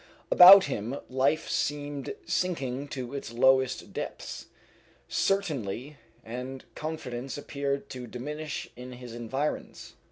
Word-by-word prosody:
About 190 +2 +11
him 125 0 -3
life 140 +5 +1
seemed 145 - -2
sinking 140 - -1
to 130 -2 -6
its 140 -5 -5
lowest 130 +2 +2
depths. - - -6 0.6
Certainty 145 - -1 0.3
and 125 +3 -6
confidence 135 -5 -5
appeared 140 -1 -3
to 125 -2 -6
diminish 150 +6 -5
in 125 +1 -9
his 125 -1 -9
environs. 130 +6 -4
135 Hz, 105 wpm, -28 LUFS, 125-145 Hz, 0.6 s, About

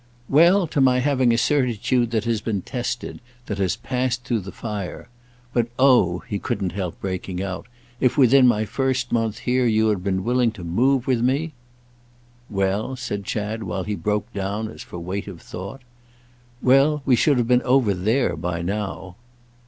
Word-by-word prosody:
"Well, 175 +6 +5
to 150 -3 -1
my 130 -1 +4
having 130 -2 +2
a 115 - +2
certitude 120 -2 +1
that 110 -2 0
has 115 -2 -1
been 105 -5 -2
tested—that 120 -3 -5
has 95 -3 +1
passed 125 -1 -2
through 120 -3 0
the 95 0 -8
fire. 105 -4 -6 0.4
But 120 -1 +1
oh," 125 -10 +4
he 100 - -3
couldn't 100 -7 -2
help 90 -2 -4
breaking 95 -1 -4
out, 95 -2 -5 0.3
"if 130 +3 +2
within 130 -1 +6
my 110 -3 +2
first 130 +1 -1
month 115 -2 0
here 125 0 +2
you 110 -1 +3
had 100 -4 -1
been 95 -1 -1
willing 120 +1 +2
to 95 -6 -10
move 125 +9 +1
with 130 -4 +1
me—!" 140 +6 0 1.0
"Well?" 100 +5 -1
said 110 -6 -5
Chad, 105 +2 -3
while 95 -2 -3
he 105 - -3
broke 105 +2 -2
down 100 +2 -3
as - - -10
for - - -9
weight 90 +4 -4
of 95 -4 -8
thought. 100 +12 -8 0.8
"Well, 140 +3 +4
we 130 - +5
should 140 +3 +3
have 120 -2 +1
been 125 0 +4
over 125 -5 +3
there 110 +8 +1
by 85 0 -3
now." 95 -1 -4
115 Hz, 175 wpm, -23 LUFS, 100-125 Hz, 1.0 s, within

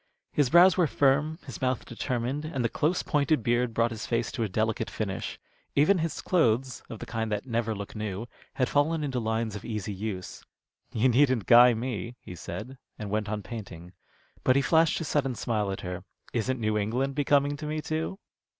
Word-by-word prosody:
His 145 -4 +2
brows 175 +4 +7
were 175 -3 +4
firm, 150 +3 +2
his 130 - -8
mouth 130 -1 0
determined, 125 +4 -2
and 135 -6 -2
the - - +2
close 155 +8 0
pointed 145 -4 +1
beard 120 +1 +1
brought 115 +1 +1
his 110 -2 -5
face 115 -1 0
to - - -4
a 110 - 0
delicate 110 +3 -1
finish. - - -4 0.4
Even 165 +7 +4
his 160 -2 -2
clothes, 130 -7 +1
of 115 - -6
the - - -7
kind 110 -1 -3
that 105 0 -2
never 115 -3 -1
look 100 +1 -7
new, 105 0 -4 0.3
had 130 - +1
fallen 155 +2 +1
into 135 -3 -1
lines 110 -1 -1
of 105 - -7
easy 105 -2 -4
use. 95 -2 -5 0.5
"You 115 +3 +2
needn't 130 -3 +3
guy 120 0 +8
me," 115 -1 -4
he - - -10
said, 125 +11 -7 0.2
and 105 -3 -6
went 105 0 -1
on 105 -1 -3
painting. 95 -7 -8 0.5
But 130 - +4
he 140 - +3
flashed 160 +5 +4
his 165 - -3
sudden 135 -4 0
smile 105 -4 -1
at 95 - -5
her. 90 0 -5 0.3
"Isn't 125 +2 0
New 110 -1 +1
England 125 +7 -1
becoming 145 0 +2
to 150 +1 -6
me, 155 +1 -2
too?" 160 +5 -3
120 Hz, 195 wpm, -28 LUFS, 110-145 Hz, 0.5 s, guy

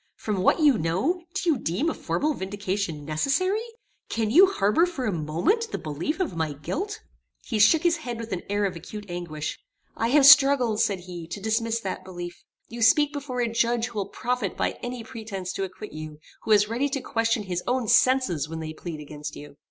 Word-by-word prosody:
"From 205 -4 -2
what 190 - +3
you 285 -7 +5
know, 205 - 0
do 395 -2 -2
you 285 - 0
deem 185 - -1
a 325 - +1
formal 305 +1 -1
vindication 190 - -3
necessary? 280 - +1 0.5
Can 220 -2 -1
you 365 +9 +8
harbour 325 - +2
for 290 -8 -4
a 215 - +1
moment 170 - 0
the - - -2
belief 160 - -3
of 355 - -1
my 160 -2 -1
guilt?" 370 - -4 0.4
He 225 -4 -2
shook 295 +11 +5
his 340 -1 +3
head 245 -7 -5
with 230 0 -7
an 180 - -2
air 205 0 +1
of 190 -2 -2
acute 205 +5 -8
anguish. 165 -4 -5 0.4
"I 230 - 0
have 275 +3 +5
struggled," 270 -6 +7
said 200 -5 +1
he, 175 -2 -8
"to 175 - -6
dismiss 225 +2 0
that 190 -2 -4
belief. 175 -2 -8 0.2
You 235 0 -8
speak 295 +5 +5
before 270 -4 -3
a 240 - +1
judge 235 0 +1
who 220 - -5
will 200 - -3
profit 245 -6 -2
by - - +1
any 245 -1 -5
pretence 215 -6 -6
to 195 - -2
acquit 190 +3 -9
you: 155 -1 -7 0.2
who - - -9
is 210 -1 +5
ready 245 +6 0
to 275 -1 -2
question 225 -2 0
his 180 -2 -3
own 250 -2 0
senses 250 - +3
when 165 0 -5
they 155 -1 -5
plead 160 -1 -7
against 150 0 -7
you." 145 -1 -11
215 Hz, 205 wpm, -25 LUFS, 175-260 Hz, 0.5 s, you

